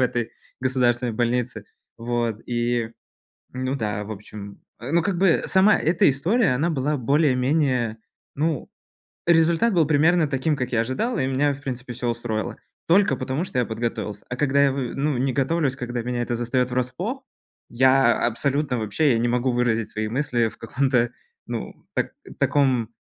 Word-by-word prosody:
этой 120 -2 0 0.3
государственной 125 -2 +1
больнице. 120 -1 -1 0.3
Вот. 115 -2 -2
И, 120 -1 -1 0.6
ну 130 +1 -2
да, 105 -4 -2
в 105 - -9
общем. 100 -1 -9 0.2
Э, 125 +4 -6
ну 170 0 +3
как 180 -1 -1
бы, 185 -4 +3
сама 190 +2 +5
эта 165 0 +3
история, 170 - +2
она 155 +7 +1
была 150 0 0
более-менее. 130 -3 +1 0.4
Ну, 155 0 -1 0.6
результат 170 +6 +4
был 165 -3 +4
примерно 155 +2 +3
таким, 145 +3 0
как 125 -2 -3
я 115 -1 +2
ожидал, 215 - -1
и 130 - 0
меня, 140 +2 +1
в 140 - -10
принципе, 125 -2 -5
всё 125 0 -4
устроило, 115 -3 -3 0.3
только 195 +4 +4
потому 140 +6 -2
что 130 -8 -2
я 120 - +1
подготовился. 110 -2 -4
А 125 - -3
когда 140 -1 +3
я 140 - +4
в 130 -3 -3
ну, 140 -1 0
не 130 +1 0
готовлюсь, 140 0 0
когда 125 -2 -4
меня 125 0 -2
это 120 0 -2
застаёт 125 +1 0
врасплох, 170 - -2 0.5
я 130 -1 +4
абсолютно 135 +2 -1
вообще, 110 +7 +1
я 115 - +2
не 120 - +1
могу 125 +2 +1
выразить 115 -3 0
свои 110 0 -3
мысли 125 -2 0
в - - -18
каком-то 125 0 +1 0.4
ну, - - -5 0.2
так - - 0 0.3
таком 130 -6 +2
130 Hz, 165 wpm, -23 LUFS, 120-145 Hz, 0.6 s, сама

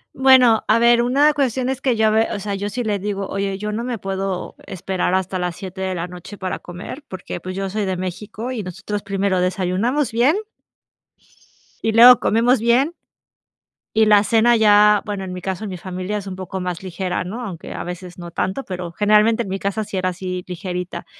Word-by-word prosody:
Bueno, 255 -4 +6
a 220 - +4
ver, 235 0 +5
una 280 +5 +3
cuestión 260 -3 0
es 265 +1 -3
que 255 -3 +1
yo 220 0 +2
a - - +5
ver, 220 +1 +2
o 205 - -3
sea, 200 0 -4
yo 200 +1 -3
sí 245 +3 -3
le 205 -2 -1
digo, 200 0 -3
oye, 195 0 -2
yo 210 +1 -4
no 225 +3 -3
me 245 -2 -3
puedo 195 -1 -4
esperar 185 0 -1
hasta 190 0 -1
las 180 -2 -2
7 190 0 -8
de 190 -1 -2
la 170 0 -3
noche 180 +3 -10
para 185 -1 -4
comer 180 - -9
porque, 185 -1 -7
pues, 185 +1 -6
yo 195 0 -2
soy 210 -1 -1
de 185 -1 -2
México 205 +6 -5
y 235 -4 -3
nosotros 195 +2 -5
primero 195 -2 0
desayunamos 190 +10 0
bien 245 - +3 1.5
y 225 - +2
luego 240 +2 +9
comemos 235 +2 +3
bien 255 +8 +3 1.0
y 220 0 +5
la 205 -1 +6
cena 230 +2 +4
ya, 210 -1 +5
bueno, 205 -2 -4
en 185 -1 -6
mi 180 - -6
caso, 190 +3 -4
en - - -5
mi 185 - -5
familia 185 +3 -4
es 200 - -6
un 190 -1 -6
poco 190 0 -6
más 180 -1 -4
ligera, 185 0 -3
¿no?, 230 +7 -6
aunque 175 -5 -7
a - - -4
veces 180 0 -8
no 170 -1 -8
tanto, 190 +10 -2
pero 180 -2 -6
generalmente 215 +4 +3
en 195 - -8
mi 195 0 -3
casa 200 +2 -2
sí 195 - -5
era 185 0 0
así, 180 0 -5
ligerita 180 -1 -5
200 Hz, 215 wpm, -20 LUFS, 185-225 Hz, 1.5 s, luego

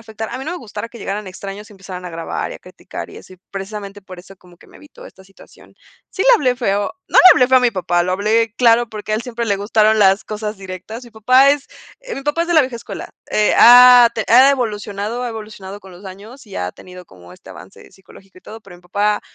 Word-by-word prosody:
afectar, 220 -1 -8
a - - -6
mí 265 - -7
no 315 - -5
me 360 - -5
gustara 215 -1 -8
que 235 - -14
llegaran 205 +1 -5
extraños 195 +3 -9
y - - -14
empezaran 185 -2 -10
a 180 - -7
grabar 165 0 -5
y - - -8
a - - -11
criticar - - -10
y - - -13
eso, 185 - -14 0.2
precisamente 200 0 -8
por 185 -1 -12
eso 195 +2 -15
como 180 -1 -21
que - - -20
me - - -18
evito 295 - -15
esta 190 - -17
situación. 195 0 -20 0.4
Sí 380 - -3
le - - +2
hablé 255 - 0
feo, 205 -4 -1 0.2
no - - +3
le 370 - +9
hablé 250 0 +2
feo 260 0 +5
a - - -2
mi 245 -1 +2
papá, 175 -3 -1
lo 185 +1 -2
hablé 220 +3 0
claro 235 -1 +3
porque 215 0 -7
a - - +2
él 220 - -3
siempre 235 -2 -5
le 200 -2 0
gustaron 215 +1 +1
las 195 0 +3
cosas 215 0 -6
directas. 190 +6 -9
Mi 240 - -15
papá 255 +5 +4
es, 285 -1 -2 0.3
eh, - - -8
mi 275 - -7
papá 295 +4 -1
es 340 - -6
de 345 - 0
la 315 - +6
vieja 255 -3 -3
escuela. 230 - -9 0.2
Eh, 210 0 +1
ha 245 +1 +8 0.3
ha 255 +4 +6
evolucionado, 215 -2 -3
ha 245 - -3
evolucionado 210 -3 -9
con 190 -2 -15
los 180 +3 -15
años 210 +7 -12
y 200 - -10
ha 90 0 -4
tenido 180 0 -14
como 90 - -17
este - - -16
avance - - -15
psicológico 190 0 -19
y - - -22
todo, 220 +1 -12
pero 190 -4 -15
mi 175 - -22
papá 205 +3 -1
210 Hz, 255 wpm, -17 LUFS, 195-240 Hz, 0.4 s, le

